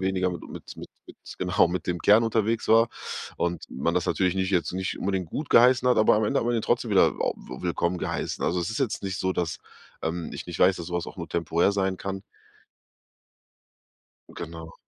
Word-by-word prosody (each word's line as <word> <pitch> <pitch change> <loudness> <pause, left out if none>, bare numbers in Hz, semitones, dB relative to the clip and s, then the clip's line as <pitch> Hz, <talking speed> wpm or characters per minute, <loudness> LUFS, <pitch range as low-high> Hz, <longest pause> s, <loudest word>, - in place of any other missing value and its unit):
weniger 95 -1 0
mit 85 - -6
mit - - -10
mit - - -9 0.5
genau, - - +3
mit 90 +1 -3
dem 90 -1 -1
Kern 105 +3 +6
unterwegs 115 0 0
war 115 +1 +6 0.5
und 85 -1 -2
man 75 +6 -1
das 90 -1 0
natürlich 90 -1 +1
nicht 95 0 0
jetzt 90 -2 +1
nicht 95 0 -3
unbedingt 95 -3 -2
gutgeheißen 125 - +4
hat, 125 - +4
aber 110 - +5
am 110 - +1
Ende - - +1
hat 115 - -2
man 120 - +1
ihn 110 - 0
trotzdem - - 0
wieder - - +6
au - - 0
w 65 - -10
willkommen 85 0 -1
geheißen. - - -3
Also, 90 +1 +1
es 85 - -2
ist 110 - -3
jetzt 110 -7 -1
nicht 95 -1 -3
so, 95 0 0
dass, 85 -2 -2 0.4
ähm, 85 +1 -3
ich - - -7
nicht 85 - -6
weiß, 95 0 +5
dass 85 - -6
so 90 - -5
was 85 - -1
auch - - -9
nur 85 - -5
temporär 85 +3 +1
sein 95 -1 0
kann. 95 0 -5 2.1
Genau. 80 -1 -8
95 Hz, 210 wpm, -26 LUFS, 85-105 Hz, 2.1 s, Kern